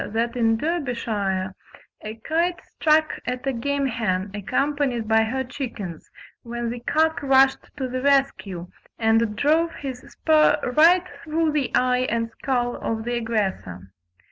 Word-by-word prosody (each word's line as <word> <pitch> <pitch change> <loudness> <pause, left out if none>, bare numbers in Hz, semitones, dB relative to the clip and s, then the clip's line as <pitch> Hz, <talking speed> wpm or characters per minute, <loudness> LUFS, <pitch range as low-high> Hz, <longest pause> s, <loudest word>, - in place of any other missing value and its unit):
that 235 +2 0
in 225 -2 +2
Derbyshire 220 - -2 0.5
a 215 +1 -6
kite 340 +2 +1
struck 310 0 +3
at 250 +1 -3
a 270 - 0
game 280 +4 -1
hen 210 -6 -1
accompanied 255 +2 -1
by 220 0 +4
her 255 +4 -1
chickens, 230 - -6 0.3
when 235 0 -4
the 245 - -5
cock 315 +6 +1
rushed 270 -1 +4
to 265 -2 -2
the 255 0 -3
rescue, 270 -10 +1 0.3
and 225 -1 +2
drove 315 +7 +2
his 265 -3 -6
spur 305 -1 +4 0.2
right 350 +4 +6 0.2
through 320 0 0
the 295 -4 0
eye 255 0 +2
and 230 0 -1
skull 245 0 -1
of 220 -1 -3
the 240 +1 -3
aggressor. 195 - -2
250 Hz, 140 wpm, -23 LUFS, 225-285 Hz, 0.5 s, right